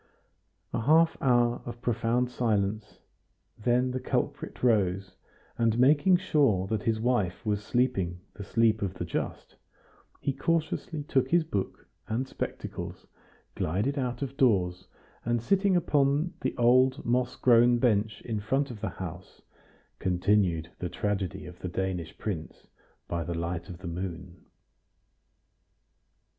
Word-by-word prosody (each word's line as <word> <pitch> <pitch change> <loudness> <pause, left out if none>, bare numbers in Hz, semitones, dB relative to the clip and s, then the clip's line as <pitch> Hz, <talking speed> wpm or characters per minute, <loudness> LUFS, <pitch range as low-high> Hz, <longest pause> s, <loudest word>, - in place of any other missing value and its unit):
A - - 0
half 160 +6 +4
hour 120 -2 +3
of 120 0 -7
profound 120 +1 +1
silence, 105 -3 -1 0.5
then 125 +3 +1
the 130 - -2
culprit - - -3
rose, 95 -5 +2 0.4
and 115 -1 +2
making 145 +8 +5
sure 140 - +2
that 105 +1 -1
his 110 0 0
wife 110 -7 0
was 105 -1 0
sleeping 105 -8 0
the 100 - -8
sleep 110 +1 +2
of 95 -2 -2
the 90 - -4
just, 85 - -4 0.6
he 140 - -1
cautiously 165 +1 -1
took 130 -3 +1
his 170 +1 +4
book 125 -12 -4 0.2
and 125 +4 -1
spectacles, - - -6 0.5
glided 105 - -1
out 125 0 -2
of 135 0 -5
doors, 90 -8 +2 0.4
and 120 0 +1
sitting 195 - +2
upon 150 0 +2
the - - -2
old 130 +3 +4
moss 125 +1 +1
grown 120 0 +5
bench 110 -3 +1
in 110 -3 -2
front 135 +6 0
of 110 -3 -9
the - - -1
house, 90 0 -8 0.6
continued 90 -2 +1
the 90 - -3
tragedy 100 -2 -2
of 90 0 -11
the 90 - -4
Danish 90 -2 -3
prince 85 -7 -5 0.4
by 85 -1 -2
the 85 +2 -4
light 85 +1 -3
of 90 - -7
the 90 0 -8
moon. 90 0 -6
115 Hz, 135 wpm, -28 LUFS, 95-130 Hz, 0.6 s, making